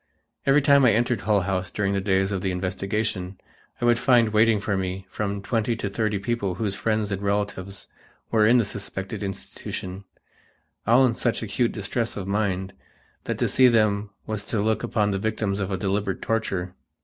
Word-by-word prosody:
Every 140 +1 +5
time 140 -1 +6
I 120 -4 +6
entered 120 +2 +1
Hull 105 -1 +2
House 95 -1 -2
during 100 -1 -1
the 100 - 0
days 95 0 +1
of 95 -2 -2
the 95 - -1
investigation, 95 +1 -2 0.4
I - - -1
would 120 -1 +4
find 120 -4 +4
waiting 110 0 +4
for 100 0 -1
me 95 0 -3
from 100 -1 -3
twenty 115 +1 0
to 100 -3 -4
thirty 110 -1 0
people 100 -3 -2
whose 100 0 -1
friends 110 0 -1
and 100 0 -2
relatives 100 -1 -2 0.4
were 110 -2 +4
in 120 +3 +6
the 115 - +3
suspected 100 +1 -6
institution, 95 -1 -6 0.8
all 125 +4 +6
in 120 - +2
such 115 +1 -1
acute 115 +3 0
distress 110 +3 -2
of 95 -2 -4
mind 95 -2 -1 0.5
that - - -2
to - - +1
see 130 0 +5
them 110 -3 +2 0.2
was 110 -2 -2
to 110 - -1
look 110 +1 +1
upon 105 -3 0
the 95 - -1
victims 110 -1 -1
of 100 -1 -2
deliberate 100 +1 -1
torture. 95 -5 -1
105 Hz, 185 wpm, -25 LUFS, 95-115 Hz, 0.8 s, time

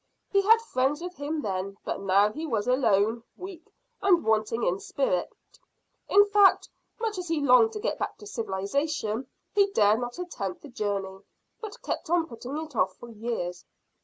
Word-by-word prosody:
He 395 - +4
had 450 +3 +5
friends 270 - 0
with 355 +1 -6
him 295 +1 -3
then, 195 0 -3
but - - -3
now 200 +2 +4
he 315 +7 -5
was 225 -5 -1
alone, 230 -3 +2 0.2
weak, 365 -3 -10 0.3
and 370 - +4
wanting 220 +1 +1
in 180 +2 +1
spirit. - - -1 0.8
In 405 +1 +7
fact, 410 -1 +5 0.3
much 440 -4 -2
as 360 - -5
he 330 -1 0
longed 285 - +5
to 425 - -4
get - - -2
back - - -3
to - - -13
civilisation, 225 - -2 0.3
he 400 -1 +4
dared 210 - +4
not 245 0 -5
attempt 215 - -5
the 295 - -10
journey, 200 -5 -3 0.4
but 435 -3 -9
kept 345 - -4
on 340 -1 +3
putting 250 +1 -7
it 310 -3 -6
off 185 -3 +1
for 240 - -11
years." 215 -6 -4
255 Hz, 175 wpm, -27 LUFS, -, 0.8 s, In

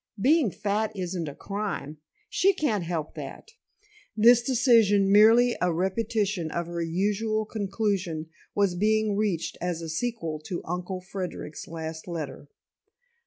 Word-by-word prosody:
Being 280 +2 +4
fat 210 +3 -1
isn't 180 -3 -3
a 140 - -10
crime. 195 -7 -4 0.3
She 390 +1 +3
can't 250 - 0
help 165 -3 -3
that." 445 - -8 0.7
This 235 +2 +7
decision, 230 -6 +4
merely 230 +4 +6
a 180 - +2
repetition 190 0 -1
of 170 +2 -2
her 170 0 -4
usual 210 +6 0
conclusion, 195 -6 -2 0.3
was 200 -3 +2
being 215 +2 +2
reached 200 -6 -1
as 175 -1 -2
a 165 -1 -6
sequel 165 -4 -3
to 175 - -4
Uncle 180 +2 -4
Frederic's 185 -4 -6
last 160 0 -6
letter. 160 -4 -5
195 Hz, 130 wpm, -27 LUFS, 170-220 Hz, 0.7 s, This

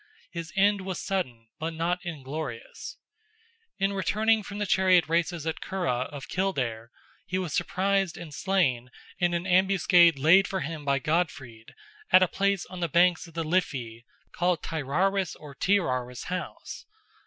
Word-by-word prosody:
His 170 -1 -6
end 200 +1 +3
was 190 -1 -4
sudden, 130 - -3
but 160 +1 -3
not 175 +2 -1
inglorious. 150 -6 -6 0.8
In 195 0 +1
returning 215 +3 +2
from 200 0 -8
the 205 - -1
chariot 185 -2 +4
races 165 0 0
at 160 - -2
the - - -12
Curragh 150 -10 -1
of 145 -2 -8
Kildare, 125 -12 -2 0.4
he 185 - -1
was 180 -5 -3
surprised 195 -1 0
and 165 -4 -9
slain 140 -10 0 0.3
in 175 -1 +2
an 170 +1 -2
ambuscade 180 -3 +5
laid 165 +8 +5
for 190 -1 -3
him 155 0 -5
by 140 -1 +2
Godfrid 135 -7 -3 0.3
at 185 - +7
a - - +3
place 200 +1 0
on 185 - -9
the 170 -1 -1
banks 175 +3 +3
of 165 - -17
the 165 - -1
Liffey 130 -9 -2 0.3
called 175 -1 0
Tyraris 170 +5 0
or 150 -2 -11
Teeraris 130 -8 0
house. 180 0 -6
175 Hz, 155 wpm, -27 LUFS, 145-190 Hz, 0.8 s, at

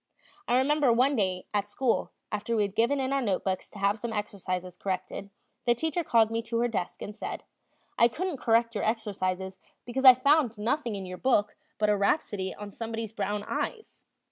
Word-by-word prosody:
I 245 - +3
remember 280 0 +3
one 255 +5 +3
day 185 -5 0
at 205 0 0
school, 250 +1 0 0.2
after 210 +2 -1
we 215 - +3
had 200 -1 -3
given 235 +6 +2
in 265 0 0
our 275 - +1
notebooks 190 -4 -1
to - - -13
have 200 +2 +1
some 235 +1 -4
exercises 185 -4 -4
corrected, 190 +1 -4 0.4
the 240 -1 +4
teacher 320 +6 -1
called 225 -6 +3
me 230 0 0
to 230 0 -3
her 240 - +3
desk 200 -6 -3
and 210 - -7
said: - - -5 0.6
"I 235 - +8
couldn't 340 +6 -3
correct 230 -1 +2
your 205 - -2
exercises 190 -4 -2 0.3
because 255 +2 -3
I 255 -2 +11
found 270 -3 +3
nothing 235 +2 -1
in 195 -1 -5
your 180 0 -7
book 210 -6 +2 0.2
but 210 - +2
a - - +3
rhapsody 200 -2 0
on 205 -1 -8
somebody's 225 0 -5
brown 210 -2 -2
eyes." 440 - -4
225 Hz, 195 wpm, -28 LUFS, 200-245 Hz, 0.6 s, I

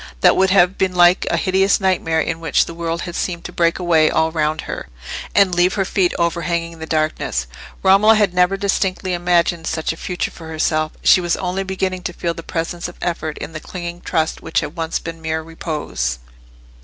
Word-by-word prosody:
That - - +6
would 190 0 +3
have 185 -1 +4
been 185 -1 +1
like 175 +1 +5
the 170 - +1
hideous 190 +3 +2
nightmare 185 -4 +1
in 160 0 -1
which 165 -3 +2
the - - -8
world 170 0 -3
had 175 -1 -6
seemed 175 -2 -3
to - - -5
break 170 -1 +1
away 165 -4 +3
all 160 0 +1
round 155 -1 0
her, - - -6 0.5
and 195 -3 +4
leave 175 +2 +3
her 195 -2 0
feet 185 -2 +1
overhanging 170 -1 -1
the 160 - -6
darkness. 155 - -1 0.4
Romola 195 +4 +6
had 210 -4 +2
never 180 +2 +3
distinctly 190 -1 -1
imagined 175 -1 +1
such 160 0 -1
a - - -13
future 180 +1 -3
for 165 - -11
herself; 155 -1 0
she 185 - +6
was 175 -1 0
only 185 +1 -2
beginning 190 -1 -2
to 180 - -4
feel 170 0 -2
the 165 - -8
presence 170 +1 -3
of 175 - -11
effort 160 -3 -3
in 165 - -7
that 155 - -6
clinging 175 0 -7
trust 160 0 -1
which 165 - 0
had 150 - -6
once 165 -1 -2
been 165 0 -7
mere 160 0 -2
repose. 155 - -3
170 Hz, 205 wpm, -19 LUFS, 160-185 Hz, 0.5 s, That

